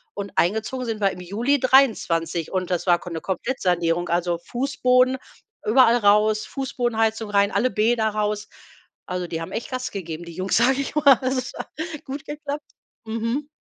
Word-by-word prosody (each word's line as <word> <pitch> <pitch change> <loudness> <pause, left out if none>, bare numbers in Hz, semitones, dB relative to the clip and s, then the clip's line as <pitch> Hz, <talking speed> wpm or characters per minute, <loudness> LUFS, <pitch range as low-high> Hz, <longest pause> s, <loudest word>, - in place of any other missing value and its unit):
und 200 -1 -5
eingezogen 220 +7 0
sind 220 -2 -4
wir 195 - +4
im 180 - -9
Juli 235 +10 0
2023 210 - +2
und 185 -2 -2
das 180 0 -1
war 175 -1 +4
Ko 180 - -9
'ne 165 - -4
Komplettsanierung, 175 -4 -1
also 175 0 0
Fußboden 255 +3 +1 0.5
überall 235 +1 +5
raus, 215 0 +3
Fußbodenheizung 225 -5 -1
rein, 200 0 +3
alle 255 - +1
Bäder 220 +1 +2
raus. 210 0 -2 0.6
Also, 180 0 -3
die 165 -1 -4
haben 165 - -7
echt 235 +4 -5
Gas 255 0 -3
gegeben, 170 -4 -6
die 170 - -9
Jungs, 185 +1 0
sage 260 +4 +3
ich 275 - -5
mal. 300 - +1 0.2
Also 260 0 0
es 255 - -6
hat - - -6 0.4
gut 280 +2 -6
geklappt. 295 0 -5 0.4
Mhm. 230 +6 -2
220 Hz, 170 wpm, -23 LUFS, 180-255 Hz, 0.6 s, überall